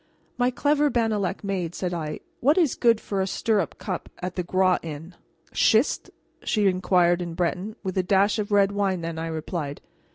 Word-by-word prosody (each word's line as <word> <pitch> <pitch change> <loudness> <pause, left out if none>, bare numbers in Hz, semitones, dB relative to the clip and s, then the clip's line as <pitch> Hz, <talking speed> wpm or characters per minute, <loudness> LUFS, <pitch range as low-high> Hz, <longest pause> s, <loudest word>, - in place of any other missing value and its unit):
"My 245 0 +2
clever 290 +3 +2
Bannalec 215 -6 0
maid," 185 -4 -2
said 180 -2 -2
I, 155 -3 -4 0.2
"what 290 +7 +3
is 330 -8 +3
good 230 -2 +3
for 200 -3 -2
a 190 - 0
stirrup 205 -2 0
cup 185 -4 -5
at 180 0 -5
the 180 - -1
Groix 185 +1 +2
Inn?" 160 +2 -8 0.4
"Schist?" 225 +6 +2 0.3
she 210 -2 +1
inquired 180 -2 +3
in 170 -1 -5
Breton. 185 +4 -2
"With 190 -2 -3
a - - +5
dash 200 +4 +2
of 210 0 -3
red 200 -1 +4
wine, 195 -3 0
then," 165 -1 -4
I 165 - -3
replied. 155 -2 -4
190 Hz, 185 wpm, -25 LUFS, 175-210 Hz, 0.4 s, a